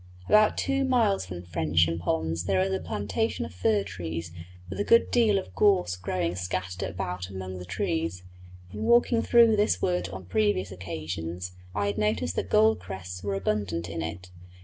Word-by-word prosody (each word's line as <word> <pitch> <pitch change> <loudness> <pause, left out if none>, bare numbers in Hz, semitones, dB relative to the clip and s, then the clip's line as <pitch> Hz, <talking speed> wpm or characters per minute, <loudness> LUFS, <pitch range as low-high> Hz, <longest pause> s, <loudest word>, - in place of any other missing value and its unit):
About 215 0 +5
two 275 0 +1
miles 230 - +2
from 90 -1 -7
Frensham 85 -1 +1
ponds 80 0 -1
there 95 -1 +2
is 95 +1 +1
a 95 - 0
plantation 100 -6 -2
of 80 - -9
fir 100 +3 +1
trees 85 -3 -5 0.4
with - - -6
a - - +2
good 230 +2 +4
deal 225 -4 +4
of 190 - -5
gorse 190 - +3
growing 90 -1 -2
scattered 90 0 -3
about 90 +2 -4
among 95 -1 -6
the 90 - -8
trees; 85 -1 -2 0.5
in 105 - -6
walking 235 -1 +4
through 230 -2 +5
this 205 - +2
wood 90 0 0
on 95 0 -8
previous 100 0 +1
occasions 85 0 -5 0.2
I 100 -1 0
had 100 +1 -1
noticed 100 -5 0
that 95 - -2
gold 110 0 +4
crests 90 -1 -7
were 100 0 -2
abundant 95 -4 -1
in 85 0 -4
it. 85 +3 -6
95 Hz, 175 wpm, -27 LUFS, 85-105 Hz, 0.5 s, About